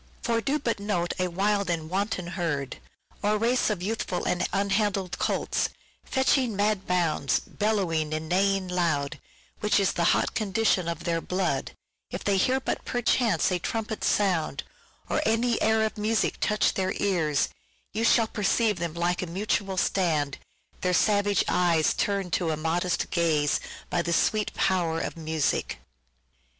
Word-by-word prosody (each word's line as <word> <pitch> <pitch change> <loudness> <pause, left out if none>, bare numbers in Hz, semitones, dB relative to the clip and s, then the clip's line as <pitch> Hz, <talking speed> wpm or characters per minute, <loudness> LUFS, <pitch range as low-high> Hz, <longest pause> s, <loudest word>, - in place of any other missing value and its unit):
" - - -30
For 230 -1 +1
do 280 +5 0
but 235 -8 -2
note 190 -4 -1
a 185 - +1
wild 200 +2 0
and 165 -2 -1
wanton 190 +1 -2
herd, 145 -7 -2 0.4
Or 210 +1 +2
race 235 +3 +2
of 200 -4 -2
youthful 205 -3 -2
and 180 - 0
unhandled 195 -1 0
colts, - - 0 0.3
Fetching 265 -3 +1
mad 205 -1 0
bounds, 165 -6 +1
bellowing 185 -8 -1
and 155 +1 -3
neighing 195 +2 +1
loud, 165 -6 -1 0.4
Which 210 0 +2
is 195 - +2
the 170 - 0
hot - - +2
condition 210 -4 +1
of 170 0 -4
their 165 -1 0
blood, 180 -7 -1 0.4
If - - -5
they 200 -1 +2
but - - +4
hear 260 +1 +2
perchance 245 -4 0
a 180 - 0
trumpet 220 +4 -3
sound, 185 -6 +1 0.4
Or - - 0
any 230 +2 +1
air 220 0 +3
of 215 - -4
music 215 +1 0
touch 210 0 +2
their 190 -1 -1
ears, 160 -8 +1 0.4
You 220 +2 -1
shall 230 0 +5
perceive 215 -1 +1
them 170 -2 -3
make 175 +1 0
a 180 - -3
mutual 195 +1 -1
stand, 155 -7 +1 0.4
Their 180 -1 +1
savage 205 0 +3
eyes 170 -3 +3
turn'd 195 -3 -1
to 170 - +1
a 155 - -1
modest 170 +3 -1
gaze 155 -4 +2 0.3
By 175 - +2
the 170 0 -1
sweet 210 +4 +1
power 175 -4 +1
of - - -4
music." 160 -2 -1
190 Hz, 160 wpm, -27 LUFS, 170-210 Hz, 0.4 s, shall